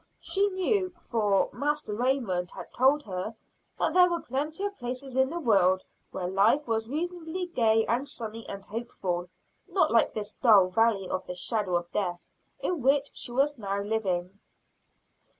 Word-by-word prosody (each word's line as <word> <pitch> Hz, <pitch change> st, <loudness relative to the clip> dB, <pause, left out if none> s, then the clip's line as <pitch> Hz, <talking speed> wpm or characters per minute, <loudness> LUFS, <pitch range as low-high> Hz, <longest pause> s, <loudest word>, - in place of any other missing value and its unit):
She 400 Hz, +1 st, +1 dB
knew, 375 Hz, 0 st, 0 dB
for 210 Hz, -, +1 dB
Master 295 Hz, -3 st, -1 dB
Raymond 225 Hz, -7 st, 0 dB
had -, -, -10 dB
told 275 Hz, +4 st, +3 dB
her, 195 Hz, +2 st, -5 dB, 0.4 s
that -, -, 0 dB
there 360 Hz, 0 st, +6 dB
were 345 Hz, -1 st, -1 dB
plenty 300 Hz, +7 st, -3 dB
of 405 Hz, 0 st, -3 dB
places 255 Hz, 0 st, -5 dB
in 265 Hz, 0 st, +3 dB
the 340 Hz, +3 st, -4 dB
world 190 Hz, -, +3 dB, 0.3 s
where 180 Hz, -1 st, -4 dB
life 210 Hz, +10 st, +3 dB
was 225 Hz, 0 st, -1 dB
reasonably 350 Hz, +3 st, -3 dB
gay 225 Hz, -9 st, +2 dB
and 245 Hz, +5 st, 0 dB
sunny 225 Hz, -3 st, -7 dB
and 195 Hz, 0 st, -7 dB
hopeful; 195 Hz, -6 st, -4 dB, 0.4 s
not 355 Hz, -6 st, +2 dB
like 230 Hz, -, +3 dB
this 210 Hz, -1 st, -3 dB
dull 205 Hz, -7 st, +6 dB
valley 210 Hz, -1 st, +2 dB
of 185 Hz, +1 st, -3 dB
the 180 Hz, -, -5 dB
shadow 185 Hz, 0 st, 0 dB
of 175 Hz, 0 st, -2 dB
death 180 Hz, -4 st, -1 dB, 0.4 s
in 350 Hz, -5 st, -1 dB
which 275 Hz, +2 st, +2 dB
she -, -, -3 dB
was 275 Hz, +2 st, +1 dB
now 200 Hz, -1 st, -2 dB
living. 200 Hz, -3 st, -2 dB
230 Hz, 165 wpm, -28 LUFS, 195-290 Hz, 0.4 s, there